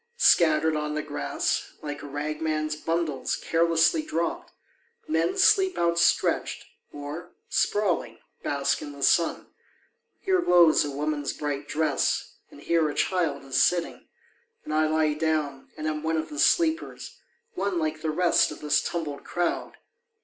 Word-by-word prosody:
Scattered 160 Hz, -, +4 dB
on 150 Hz, 0 st, -2 dB
the 155 Hz, -, -2 dB
grass, 145 Hz, -1 st, -2 dB
like 145 Hz, -1 st, -5 dB
a -, -, -8 dB
ragman's 155 Hz, +1 st, -2 dB
bundles 165 Hz, -3 st, -2 dB
carelessly 165 Hz, -, +2 dB
dropped, 310 Hz, 0 st, -3 dB, 0.6 s
Men 345 Hz, +5 st, 0 dB
sleep 380 Hz, -1 st, +4 dB
outstretched 170 Hz, 0 st, +1 dB, 0.3 s
or, 150 Hz, +5 st, -8 dB, 0.2 s
sprawling, 175 Hz, -, 0 dB, 0.2 s
bask 140 Hz, -1 st, -1 dB
in 145 Hz, -1 st, -7 dB
the 140 Hz, -1 st, -7 dB
sun; 170 Hz, -1 st, +2 dB, 0.7 s
Here 375 Hz, -2 st, +1 dB
glows 175 Hz, -, +5 dB
a 145 Hz, -, -3 dB
woman's 145 Hz, 0 st, -2 dB
bright 145 Hz, -1 st, -4 dB
dress 155 Hz, -3 st, 0 dB, 0.2 s
and 145 Hz, -, -15 dB
here 165 Hz, -1 st, +1 dB
a -, -, -5 dB
child 180 Hz, -6 st, 0 dB
is 135 Hz, -, +1 dB
sitting, 175 Hz, -1 st, 0 dB, 0.6 s
And 155 Hz, -, -4 dB
I 155 Hz, 0 st, +3 dB
lie 155 Hz, -1 st, +2 dB
down 150 Hz, -3 st, -2 dB
and 155 Hz, -, -5 dB
am 155 Hz, -1 st, -2 dB
one 160 Hz, +1 st, -1 dB
of 155 Hz, -, -3 dB
the 300 Hz, -, -7 dB
sleepers, 325 Hz, -1 st, +1 dB, 0.3 s
one 200 Hz, -, -2 dB
Like 155 Hz, -1 st, -2 dB
the 160 Hz, -, -2 dB
rest 175 Hz, +3 st, +3 dB
of 150 Hz, -, -9 dB
this 150 Hz, -1 st, +2 dB
tumbled 155 Hz, -4 st, -4 dB
crowd. 175 Hz, -1 st, -2 dB
155 Hz, 145 wpm, -26 LUFS, 150-170 Hz, 0.7 s, glows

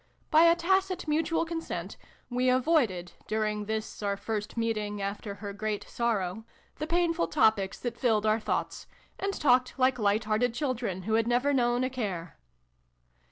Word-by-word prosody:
By 320 Hz, +1 st, +7 dB
a 335 Hz, 0 st, +6 dB
tacit 370 Hz, +1 st, +1 dB
mutual 325 Hz, +2 st, +1 dB
consent, 330 Hz, 0 st, -5 dB, 0.3 s
we 250 Hz, +1 st, +1 dB
avoided, 250 Hz, -, +2 dB, 0.2 s
during 215 Hz, -1 st, -1 dB
this 220 Hz, +1 st, -4 dB
our 200 Hz, -1 st, -1 dB
first 210 Hz, +1 st, -4 dB
meeting 215 Hz, -2 st, -1 dB
after 200 Hz, +1 st, -4 dB
her 205 Hz, -1 st, -7 dB
great 215 Hz, 0 st, -3 dB
sorrow, 220 Hz, -4 st, -1 dB, 0.3 s
the 305 Hz, -, -3 dB
painful 340 Hz, 0 st, +1 dB
topics 220 Hz, -9 st, +2 dB
that 240 Hz, -1 st, -4 dB
filled 220 Hz, -4 st, +2 dB
our 215 Hz, +1 st, +3 dB
thoughts, -, -, -3 dB, 0.3 s
and 395 Hz, +1 st, -1 dB
talked 255 Hz, -7 st, +2 dB
like 255 Hz, -1 st, +2 dB
light 210 Hz, +1 st, +2 dB
hearted 220 Hz, +3 st, +1 dB
children 245 Hz, -9 st, -2 dB
who 220 Hz, +3 st, -2 dB
had 225 Hz, +1 st, +2 dB
never 250 Hz, +4 st, +2 dB
known 245 Hz, -1 st, +2 dB
a 255 Hz, -, 0 dB
care. 185 Hz, -, -4 dB
230 Hz, 160 wpm, -29 LUFS, 210-280 Hz, 0.3 s, By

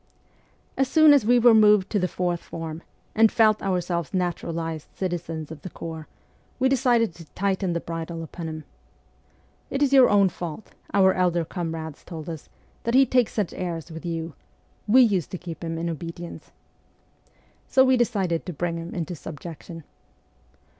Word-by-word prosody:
As 270 Hz, -, +2 dB
soon 310 Hz, +1 st, +6 dB
as 265 Hz, -7 st, +3 dB
we 245 Hz, +1 st, +5 dB
were 240 Hz, -1 st, +6 dB
moved 210 Hz, -3 st, +5 dB
to 210 Hz, -, +1 dB
the 180 Hz, -, +1 dB
fourth 175 Hz, -1 st, -2 dB
form, 165 Hz, 0 st, -7 dB, 0.3 s
and 220 Hz, 0 st, +5 dB
felt 215 Hz, -2 st, +4 dB
ourselves 175 Hz, -2 st, -2 dB
naturalized 165 Hz, -3 st, -3 dB
citizens 165 Hz, -4 st, -4 dB
of 155 Hz, -2 st, -9 dB
the 185 Hz, -, -7 dB
corps, 160 Hz, -2 st, -7 dB, 0.5 s
we 260 Hz, -, +2 dB
de 270 Hz, -, +3 dB
cided 240 Hz, -6 st, +2 dB
to 165 Hz, 0 st, -12 dB
tighten 190 Hz, -2 st, 0 dB
the 170 Hz, -, -1 dB
bridle 165 Hz, 0 st, -5 dB
upon 165 Hz, 0 st, -7 dB
him. 155 Hz, 0 st, -7 dB, 0.6 s
' -, -, -37 dB
It 275 Hz, +1 st, 0 dB
is 280 Hz, -1 st, +2 dB
your 265 Hz, -2 st, +7 dB
own 200 Hz, -2 st, +4 dB
fault,' 175 Hz, +3 st, -7 dB, 0.2 s
our 190 Hz, -1 st, +5 dB
elder 175 Hz, -2 st, +1 dB
comrades 160 Hz, -3 st, -5 dB
told 160 Hz, -2 st, -8 dB
us, 160 Hz, -3 st, -8 dB, 0.2 s
' -, -, -35 dB
that 235 Hz, +1 st, 0 dB
he 270 Hz, +1 st, +7 dB
takes 250 Hz, -3 st, +2 dB
such 205 Hz, -5 st, -1 dB
airs 170 Hz, -2 st, -5 dB
with 160 Hz, +2 st, -8 dB
you; 165 Hz, -2 st, -4 dB, 0.5 s
we 255 Hz, +5 st, +7 dB
used 195 Hz, -, +1 dB
to -, -, -2 dB
keep 170 Hz, -2 st, -8 dB
him 165 Hz, 0 st, -3 dB
in 165 Hz, +1 st, -2 dB
obedience.' 170 Hz, +1 st, -7 dB, 1.2 s
So 265 Hz, -, +5 dB
we 260 Hz, 0 st, +4 dB
decided 200 Hz, -9 st, 0 dB
to 180 Hz, -, -4 dB
bring 170 Hz, +2 st, -2 dB
him 165 Hz, +1 st, -7 dB
into 170 Hz, -1 st, -3 dB
subjection. 165 Hz, +1 st, -9 dB
175 Hz, 175 wpm, -25 LUFS, 165-210 Hz, 1.2 s, your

